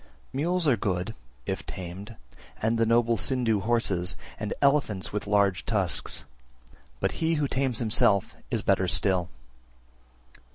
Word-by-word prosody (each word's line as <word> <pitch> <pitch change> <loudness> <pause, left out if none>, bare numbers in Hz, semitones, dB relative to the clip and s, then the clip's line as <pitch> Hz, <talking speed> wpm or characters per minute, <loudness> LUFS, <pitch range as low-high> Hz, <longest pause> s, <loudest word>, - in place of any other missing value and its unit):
322. 130 - -6
Mules 175 +2 +1
are 130 -5 +4
good, 95 +1 -2 0.3
if - - -3
tamed, 95 +5 -8 0.4
and 115 +1 +1
noble 115 0 +3
Sindhu 120 -2 +1
horses, 100 -5 +1 0.2
and 105 -1 -3
elephants 140 -11 +1
with 105 0 -3
large 100 -3 +2
tusks; 95 - -1 0.7
but - - 0
he 165 0 +2
who 150 -2 0
tames 130 -3 -1
himself 105 -3 +2 0.2
is - - -1
better - - +2
still. 90 -3 +3
110 Hz, 130 wpm, -27 LUFS, 95-125 Hz, 0.7 s, are